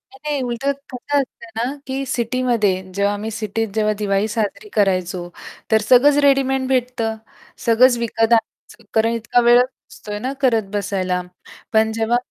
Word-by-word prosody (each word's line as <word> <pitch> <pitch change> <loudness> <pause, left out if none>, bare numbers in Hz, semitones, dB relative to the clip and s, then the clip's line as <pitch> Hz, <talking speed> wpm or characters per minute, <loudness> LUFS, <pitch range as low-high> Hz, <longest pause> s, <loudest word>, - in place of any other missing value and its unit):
नाही, 300 +2 -5
नाही. 275 - -1
उलटं 245 +3 -1 0.2
कसं 285 +4 -2
असतं 235 -3 -6
ना, 230 - 0 0.2
की 270 +1 -3
सिटीमध्ये 235 -6 0
जेव्हा 200 +1 +1
मी 215 +2 -4
सिटीत 225 0 -2
जेव्हा 215 -1 +2
दिवाळी 200 0 0
साजरी 220 - -3
करायचो, 185 -3 0 0.4
तर 220 - +4
सगळंच 260 +6 +5
रेडीमेड 270 -1 +2
भेटतं. 250 -3 -1 0.5
सगळंच 240 +2 +5
विकत 225 -1 -1
आणायचं, 230 0 -2
कारण 225 +1 +2
इतका 230 +1 +1
वेळ 240 +1 +7
असतो 250 -4 -8
आहे 205 - -3
ना 260 +2 -2
करत 225 -6 +2
बसायला. 185 -3 -1 0.5
पण 220 0 +3
जेव्हा 225 +2 +1
230 Hz, 155 wpm, -20 LUFS, 210-255 Hz, 0.5 s, वेळ